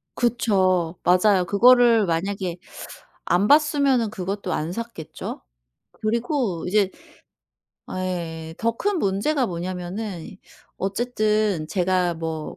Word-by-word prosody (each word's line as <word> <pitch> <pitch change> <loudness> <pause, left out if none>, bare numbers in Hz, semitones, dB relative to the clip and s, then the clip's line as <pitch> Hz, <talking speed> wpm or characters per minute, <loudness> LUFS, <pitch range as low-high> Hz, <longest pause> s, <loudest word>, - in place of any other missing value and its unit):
그쵸. 190 -8 +1
맞아요. 185 +1 +4
그거를 230 +2 +5
만약에 180 +1 -2 0.7
안 180 +4 +2
봤으면은 280 -6 +3
그것도 195 -1 -4
안 155 +2 -2
샀겠죠. 230 -6 -7 0.5
그리고 235 - -1
이제 200 0 +2 1.0
아 185 - -5
예예. 165 -3 -5
더 230 0 +1
큰 410 -2 0
문제가 245 +5 0
뭐냐면은 180 +1 -5 0.4
어쨌든 210 -4 0
제가 180 -2 +1
뭐 160 -1 -5
195 Hz, 220 characters per minute, -23 LUFS, 175-230 Hz, 1.0 s, 그거를